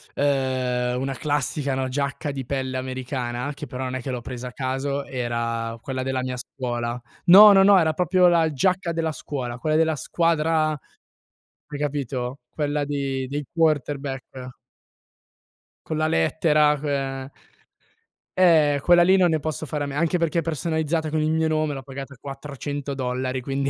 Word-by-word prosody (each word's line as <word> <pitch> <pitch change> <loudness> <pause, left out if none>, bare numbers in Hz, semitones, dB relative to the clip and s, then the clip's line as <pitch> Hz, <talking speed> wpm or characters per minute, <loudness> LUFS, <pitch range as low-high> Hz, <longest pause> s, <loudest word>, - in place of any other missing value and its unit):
ehm, 130 -3 0
una 135 0 -2
classica 140 -2 -1
giacca 140 +2 -2
di 135 -2 -5
pelle 130 -1 -2
americana, 130 0 -4
che 150 +1 -8
però 130 -1 -6
non 130 0 -3
è 130 - -3
che 130 - -4
l'ho 125 -1 -4
presa 125 +1 -6
a 125 - -16
caso, 135 +2 -2
era 115 -2 -3
quella 130 -1 -4
della 130 -1 -1
mia 130 0 -4
scuola. 120 -1 -4 0.3
No, 205 +4 +10
no, 195 -1 +6
no, 200 -1 +7
era 160 -2 +2
proprio 180 +2 +3
la 165 -2 +3
giacca 180 +5 0
della 165 -1 -1
scuola, 125 -4 -5
quella 155 +5 0
della 160 0 +3
squadra, 160 +2 +1 1.0
hai 145 - -6
capito? 135 -3 -3
Quella 145 -1 -1
di 135 -2 -2
dei 145 +1 -4
quarterback. 140 -5 -2 1.3
Con 155 - -2
la 155 0 +1
lettera, 150 - +2
ehm 135 -2 -3 1.1
Eh, 155 -6 +5
quella 175 0 +6
lì 190 +2 +5
non 180 -2 +4
ne 160 -1 +1
posso 155 0 -4
fare 150 +1 -2
a 145 - -3
me, 140 - -6
anche 170 +3 +1
perché 170 -1 0
è - - 0
personalizzata 160 0 -1
con 155 0 0
il 155 - +1
mio 160 0 +1
nome, 155 -2 0
l'ho 135 - -7
pagata 135 +1 -8
400 140 0 -6
dollari, 130 0 -2
quindi 135 +2 -2
140 Hz, 165 wpm, -24 LUFS, 130-155 Hz, 1.3 s, No